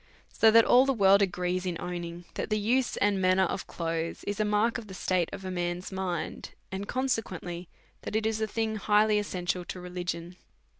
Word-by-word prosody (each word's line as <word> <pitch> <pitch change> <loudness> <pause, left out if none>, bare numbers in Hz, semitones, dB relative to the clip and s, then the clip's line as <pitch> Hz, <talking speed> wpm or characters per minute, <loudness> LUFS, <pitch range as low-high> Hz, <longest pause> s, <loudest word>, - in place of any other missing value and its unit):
So 225 - +5
that 230 +1 +7
all 255 +2 +6
the 270 - +2
world 200 -1 +5
agree 180 -1 0
in 180 -3 -3
owning 175 -1 -5
that - - -4
the 215 - +1
use 240 +5 +1
and 200 -2 +2
man 185 0 +4
ner 190 - +5
of 185 - -2
clothes 165 -1 -3
is 205 +1 -3
a - - +3
mark 210 +3 +1
of 220 - -11
the 190 - -9
state 185 -3 0
of 195 -1 -7
a 185 - -3
man's 175 +1 -3
mind_, 180 -4 -3 0.2
and 195 +1 -4
consequently, 185 -9 -2 0.3
that - - -5
it 220 0 +1
is 220 0 0
a 220 - +1
thing 220 0 -1
highly 210 +1 +3
essential 180 -3 -2
to 185 - -6
religion. 180 -1 -5
190 Hz, 205 wpm, -29 LUFS, 180-215 Hz, 0.3 s, that